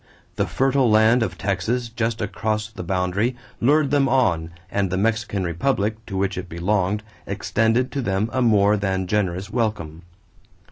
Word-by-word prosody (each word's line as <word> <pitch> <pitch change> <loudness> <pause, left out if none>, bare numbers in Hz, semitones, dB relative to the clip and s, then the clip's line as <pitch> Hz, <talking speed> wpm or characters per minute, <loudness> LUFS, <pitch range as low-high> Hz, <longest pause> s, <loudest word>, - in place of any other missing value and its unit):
The - - 0
fertile 135 -2 +2
land 110 +3 +5
of 105 -5 -2
Texas 105 +5 -1
just 115 -1 -2
across 110 +1 -2
the - - -7
boundary 95 +6 0 0.2
lured 145 +3 +3
them 140 -2 +3
on 90 -12 +2 0.2
and 100 -2 0
the 95 - -1
Mexican 110 -1 0
republic 105 - -1
to 95 - -4
which 95 -1 -1
it 90 0 -8
belonged 95 +4 0 0.2
extended 115 +5 +1
to 140 - -2
them 100 -1 0
a 130 - +1
more 105 -3 +4
than 95 -2 -1
generous 95 0 -1
welcome. 105 -9 -2
105 Hz, 155 wpm, -22 LUFS, 95-115 Hz, 0.2 s, land